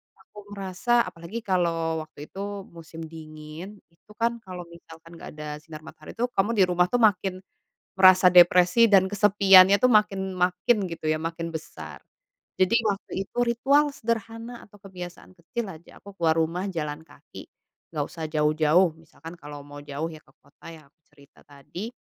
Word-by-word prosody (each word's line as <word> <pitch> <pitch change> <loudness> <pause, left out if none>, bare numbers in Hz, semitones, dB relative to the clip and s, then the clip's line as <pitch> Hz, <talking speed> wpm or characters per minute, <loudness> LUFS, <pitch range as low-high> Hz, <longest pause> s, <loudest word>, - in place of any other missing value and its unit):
aku 200 +2 -23 0.2
merasa 200 +5 0
apalagi 180 +5 -8
kalau 165 -4 -1
waktu 150 -1 -13
itu 200 +1 -6
musim 165 -1 -12
dingin 160 +4 -10
itu 165 +5 -24
kan 235 +1 -1
kalau 180 -1 -7
misalkan 165 0 -15
nggak - - -10
ada 150 0 -7
sinar 155 0 -11
matahari 155 -1 -12
itu 245 +2 -2
kamu 205 +4 +2
di 200 -4 +4
rumah 180 0 +3
tuh 245 +3 0
makin 190 -3 +2 0.6
merasa 185 -1 +7
depresi 180 +5 +6
dan 190 -1 +5
kesepiannya 200 -1 +6
tuh 255 - +4
makin 195 -3 +1
makin 180 +6 +1
gitu 165 -2 -6
ya, 155 - +1
makin 165 +1 -4
besar. 160 -1 -9 0.5
Jadi 185 +5 +3
waktu 200 -1 -3
itu - - -28
ritual 275 +5 +2
sederhana 230 0 -5
atau 205 0 -19
kebiasaan 180 -2 -10
kecil 215 +7 -5
aja 160 +2 -16
aku 200 -1 -14
keluar 165 -1 +1
rumah 170 +4 -1
jalan 150 -2 -5
kaki - - -15 0.4
nggak 150 -3 -3
usah 160 -2 -7
jauh-jauh 155 +3 +2
misalkan 165 +1 -13
kalau 145 -3 -11
mau 145 0 -11
jauh 145 +2 -5
ya 155 - -13
ke - - -26
kota 145 - -20
yang 155 -3 -14
aku 160 +3 -48
cerita 140 -1 -22
tadi. 145 +10 -9
180 Hz, 165 wpm, -25 LUFS, 160-200 Hz, 0.6 s, merasa